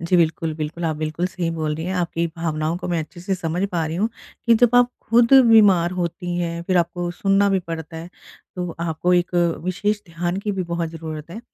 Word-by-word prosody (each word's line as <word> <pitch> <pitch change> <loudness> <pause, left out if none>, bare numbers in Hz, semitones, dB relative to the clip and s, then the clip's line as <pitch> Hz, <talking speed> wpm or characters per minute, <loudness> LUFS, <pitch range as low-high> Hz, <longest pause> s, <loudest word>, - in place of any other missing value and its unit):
जी, 170 +2 +1
बिल्कुल, 165 -1 +1
बिल्कुल, 155 +2 -4
आप 160 -2 0
बिल्कुल 155 +3 -2
सही 180 -2 -3
बोल 155 -2 -2
रही 160 - -5
हैं। 185 - -2
आपकी 170 -1 -1
भावनाओं 160 0 -1
को 180 0 -6
मैं 175 -2 0
अच्छे 160 +3 -9
से 190 +2 -1
समझ 175 0 -3
पा 170 -4 -1
रही 160 - -4
हूँ, 210 +5 +1 0.4
कि 235 - +6
जब 245 +1 +3
आप 245 0 +5 0.2
खुद 235 +2 +4
बीमार 200 -7 +6
होती 175 0 -3
हैं, 170 -1 -2
फिर 185 +1 0
आपको 175 0 0
सुनना 195 +2 +2
भी 195 - +3
पड़ता 165 -2 -7
है, 165 +2 -7 0.5
तो 180 -1 -3
आपको 170 +2 0
एक 175 0 0 0.3
विशेष 205 +3 -1
ध्यान 175 +2 -3
की 205 0 -2
भी 190 -2 -2
बहुत 170 -1 -2
ज़रूरत 160 -1 -7
है। 220 - -7
175 Hz, 220 wpm, -22 LUFS, 165-185 Hz, 0.5 s, कि